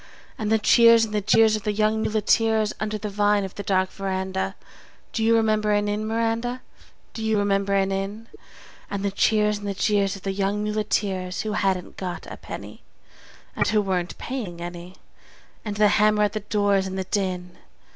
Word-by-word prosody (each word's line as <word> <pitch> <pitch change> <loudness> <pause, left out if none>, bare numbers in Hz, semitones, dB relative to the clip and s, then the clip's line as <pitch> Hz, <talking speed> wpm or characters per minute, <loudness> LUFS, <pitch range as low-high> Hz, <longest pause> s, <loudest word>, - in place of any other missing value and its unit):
And 215 -1 -3
the 220 - +5
cheers 230 +1 +6
and 215 - -9
the 210 - +1
jeers 220 +2 +4
of 215 - -3
the 210 - -1
young 215 +1 +1
muleteers 220 0 +2
(Under 215 0 -2
the 210 - -5
vine 205 0 +2
of 190 - -6
the - - -6
dark 190 -1 0
veranda)? 190 0 -3 0.6
Do 225 - -1
you 230 +1 +4
remember 215 -1 +2
an 205 0 +1
Inn, 210 +1 -2
Miranda, 230 +2 -1 0.5
Do 225 - -5
you 220 -1 +1
remember 200 -1 +1
an 195 0 +1
Inn? 195 +3 -4 0.6
And 200 0 -3
the 200 - 0
cheers 210 +1 +2
and 205 - -6
the 200 - -2
jeers 200 0 +1
of 195 - -12
the 195 - -1
young 200 +2 -1
muleteers 200 -3 -1
Who 215 - -3
hadn't 190 -3 -1
got 180 -2 -5
a - - -7
penny, - - -9 0.7
And - - +1
who 215 - +3
weren't 185 -3 -2
paying 215 -10 -5
any, 175 +1 -8 0.7
And 210 -2 -4
the 210 0 +5
hammer 210 0 +3
at 205 - +1
the 215 - -2
doors 205 -2 +1
and 190 0 -5
the 190 - -1
din? 185 -2 -3
205 Hz, 190 wpm, -24 LUFS, 195-215 Hz, 0.7 s, cheers